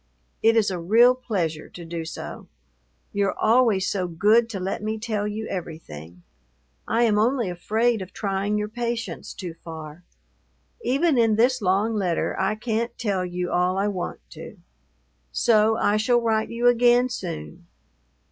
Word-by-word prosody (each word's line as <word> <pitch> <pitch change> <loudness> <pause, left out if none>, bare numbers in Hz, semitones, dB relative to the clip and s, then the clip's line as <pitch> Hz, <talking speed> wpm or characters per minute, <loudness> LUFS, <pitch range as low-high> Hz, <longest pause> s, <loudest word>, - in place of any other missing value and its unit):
It 225 +1 +4
is 210 -3 +3
a 180 - -3
real 230 +9 +5
pleasure 180 -11 -3
to 175 - -10
do 165 0 -5
so. 160 - -8 0.7
You're 200 -1 0
always 220 -4 +3
so 185 -3 -1
good 210 +7 +3
to 205 -4 -4
let 190 +2 -3
me 215 +1 -2
tell 215 -2 -2
you 215 +1 -4
everything. 90 - -8 0.6
I 230 +1 +2
am 210 -3 +3
only 235 -3 +1
afraid 220 +5 0
of 185 - -8
trying 200 0 -1
your 210 0 -1
patience 235 -4 -4
too 180 -4 -7
far. 160 0 -10 0.8
Even 275 +1 +2
in 225 -2 +4
this 250 +3 +2
long 200 +4 +1
letter 185 -6 -1
I 190 +3 +1
can't 230 +1 -2
tell 200 -6 -1
you 180 0 -3
all 180 +1 +1
I 200 +2 +1
want 180 -3 -4
to; 165 +5 -10 0.7
so 220 -1 +3
I 210 -1 +2
shall 240 +3 +3
write 220 -2 0
you 235 +1 -3
again 245 +1 +5
soon. 175 -5 -7
210 Hz, 155 wpm, -24 LUFS, 180-230 Hz, 0.8 s, real